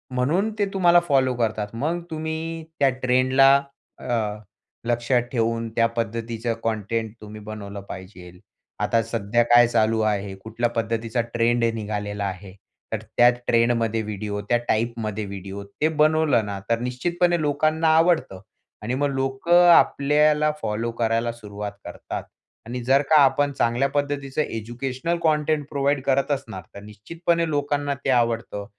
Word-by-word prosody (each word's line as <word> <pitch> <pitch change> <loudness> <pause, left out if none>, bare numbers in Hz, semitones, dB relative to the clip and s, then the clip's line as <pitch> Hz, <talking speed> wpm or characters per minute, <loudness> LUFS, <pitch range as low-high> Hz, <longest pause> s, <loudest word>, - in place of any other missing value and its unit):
म्हणून 165 +12 +1
ते 205 - +3
तुम्हाला 175 -3 +5
फॉलो 135 -3 +3
करतात. 110 -3 -1
मग 155 +9 -2
तुम्ही 160 +1 -4 0.2
त्या 140 -1 +5
ट्रेंडला 130 +2 +5 0.4
अ, 110 -3 -2 0.5
लक्षात 120 +1 +1
ठेवून 115 -1 -1
त्या 115 - +4
पद्धतीचं 115 0 -2
कंटेंट 110 0 -2
तुम्ही 105 0 -9
बनवलं 105 -1 -7
पाहिजे. 90 -1 -9 0.5
आता 115 - +2
सध्या 115 +1 0
काय 120 0 +6
चालू 110 -1 +1
आहे? 100 -2 -1
कुठल्या 115 +2 -1
पद्धतीचा 115 +1 -1
ट्रेंड 120 0 +2
निघालेला 105 -1 -4
आहे? 95 0 -6 0.4
तर - - -2 0.2
त्या 120 0 +7
ट्रेंडमध्ये 115 -2 +1
व्हिडिओ 105 -1 -4
त्या 120 - +4
टाइपमध्ये 110 -2 -1
व्हिडिओ 100 0 -7
ते 100 +10 -2
बनवलं 155 -5 +2
ना 100 -1 -5
तर 115 0 +2
निश्चितपणे 170 +8 0
लोकांना 155 +2 +1
आवडतं. 165 - +2 0.4
आणि 115 +4 -3
मग 145 +2 0
लोकं 135 +7 +3
आपल्याला 150 0 +4
फॉलो 110 +2 -2
करायला 115 +1 +1
सुरुवात 105 -3 -7
करतात. - - -6 0.4
आणि 120 +2 -5
जर 135 +3 +4
का 155 -1 +7
आपण 140 +1 +2
चांगल्या 125 +1 +1
पद्धतीचं 145 0 -2
एज्युकेशनल 125 +7 -3
कंटेंट 150 -2 +1
प्रोव्हाईड 140 -1 0
करत 140 +2 +1
असणार 130 -9 -3
तर 100 - -8
निश्चितपणे 165 - -2
लोकांना 145 -1 -1
ते - - +1
आवडतं. 115 -4 0
120 Hz, 140 wpm, -23 LUFS, 110-145 Hz, 0.5 s, त्या